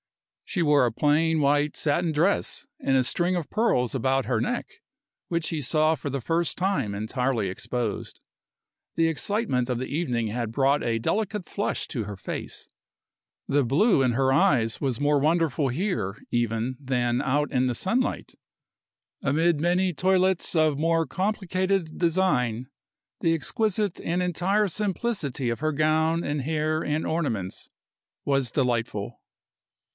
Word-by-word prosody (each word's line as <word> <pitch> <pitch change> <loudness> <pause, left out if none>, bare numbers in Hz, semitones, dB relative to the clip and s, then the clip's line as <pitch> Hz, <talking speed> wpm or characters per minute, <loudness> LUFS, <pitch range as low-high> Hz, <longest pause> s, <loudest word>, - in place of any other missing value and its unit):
She 180 - -1
wore 145 -4 +4
a 120 - 0
plain 155 +5 +2
white 145 +1 +2
satin 160 +3 +1
dress 175 - 0
and 135 - +2
a 130 - +3
string 175 +8 +1
of 165 - -4
pearls 140 - +1
about 135 +1 +1
her 115 -4 0
neck, - - -1 0.6
which 170 -2 0
he 160 -2 -2
saw 155 +4 +3
for 150 - -5
the 140 0 -2
first 165 +7 -1
time 160 - 0
entirely 110 +1 -1
exposed. 110 +3 -4 0.8
The 165 0 +3
excitement 165 - 0
of 125 - 0
the 130 - -3
evening 125 -8 -1
had 115 0 -3
brought 135 +4 +2
a 115 -1 0
delicate 210 - -1
flush 205 - -2
to 120 -6 -2
her 100 -1 -7
face; 95 - -6 0.8
the 145 0 +2
blue 145 - +3
in 130 -2 +3
her 135 +2 +2
eyes 120 -5 +2
was 130 -5 -1
more 145 0 +3
wonderful 155 -2 +1
here, 130 - -2
even, 120 +1 0
than 125 -2 0
out 145 +3 0
in 130 -1 +2
the 125 - -1
sunlight. 235 - -1 0.9
Amid 160 +2 +2
many 180 +2 +2
toilettes 185 +1 +1
of 155 -3 +3
more 165 +1 +2
complicated 185 -1 -1
design, 150 -10 +1 0.6
the 165 0 +3
exquisite 210 - -1
and 175 +2 -1
entire 190 +4 +1
simplicity 190 - -2
of 115 - -2
her 155 +1 0
gown 160 +2 +1
and 145 0 -2
hair 155 +2 -1
and 150 +2 -1
ornaments 115 - -2 0.6
was 135 -4 +1
delightful. 120 -6 -1
150 Hz, 145 wpm, -26 LUFS, 125-175 Hz, 0.9 s, wore